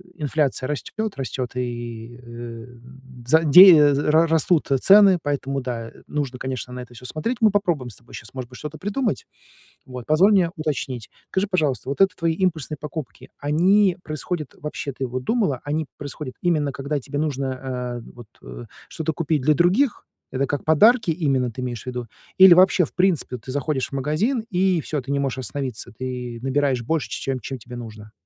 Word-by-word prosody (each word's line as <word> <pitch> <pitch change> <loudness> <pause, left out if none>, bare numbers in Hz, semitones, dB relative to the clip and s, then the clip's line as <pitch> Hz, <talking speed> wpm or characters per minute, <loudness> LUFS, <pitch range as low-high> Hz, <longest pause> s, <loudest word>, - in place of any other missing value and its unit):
инфляция 145 -4 -1
растёт, 205 +9 -4
растёт, 130 -2 -4
и, 120 -1 -5
э, - - -17
м 120 +2 -11
за 160 +4 +4
дея 155 -2 +8
з 140 - 0
ра 160 +2 +5
растут, 160 -1 +1
э, 135 - +4
цены, 195 -1 +6
поэтому 140 -1 -2
да, 115 -2 -5
и - - -19 0.2
нужно, 135 -4 -3
конечно, 125 -2 -5
на 125 - -6
это 125 -1 -12
всё 125 +1 -12
смотреть. 225 - -3
Мы 215 -2 +5
попробуем 175 -11 0
с - - -11
тобой 120 - -14
щас, 115 - -11
может 130 -2 -6
быть, 125 - -12
что-то 150 0 -8
придумать. 205 - -2 0.6
Вот, 125 -2 -9
позволь 180 +7 +5
мне 185 -4 +4
уточнить. 130 - -4 0.2
Скажи, 190 +2 0
пожалуйста, 150 - -1
вот 140 - -2
это 190 -2 +4
твои 165 -1 +1
импульсные 160 -5 -1
покупки, 150 -1 -8
они 180 +6 +3
происходят 155 0 -5
вообще, 145 -2 -5
ты 130 - -3
вот 125 +1 -4
думала, 195 - 0
они 155 +1 -1
происходят 145 -2 -7
именно 155 -5 +1
когда 140 +2 -3
тебе 140 +2 -5
нужно, 140 -3 -1
а, 125 -2 -5 0.2
вот, 120 -3 -12
э, - - -9 0.2
что-то 160 0 -3
купить 155 -2 -1
для 155 +1 +4
других? 195 - +2 0.3
Это 135 +1 0
как 145 - -3
подарки 215 +5 +5
именно 135 -7 0
ты 125 - -7
имеешь 120 -3 -4
в - - -21
виду? 125 -2 -4 0.3
Или 190 -2 +10
вообще, 185 -1 +5
в - - -14
принципе, 180 -8 +1
ты 130 +3 -9
заходишь 140 -1 -2
в - - -17
магазин 195 - 0
и 185 -2 +2
всё, 150 0 -3
ты 135 +2 -6
не 140 - +1
можешь 135 -3 -2
остановиться, 130 -1 -5
ты 125 0 -6
набираешь 135 -1 0
больше, 125 -1 -2
ч - - -4
чем 135 -1 -2
чем 130 +3 -6
тебе 120 +2 -10
нужно? 110 -3 -9
140 Hz, 195 wpm, -22 LUFS, 125-165 Hz, 0.6 s, Или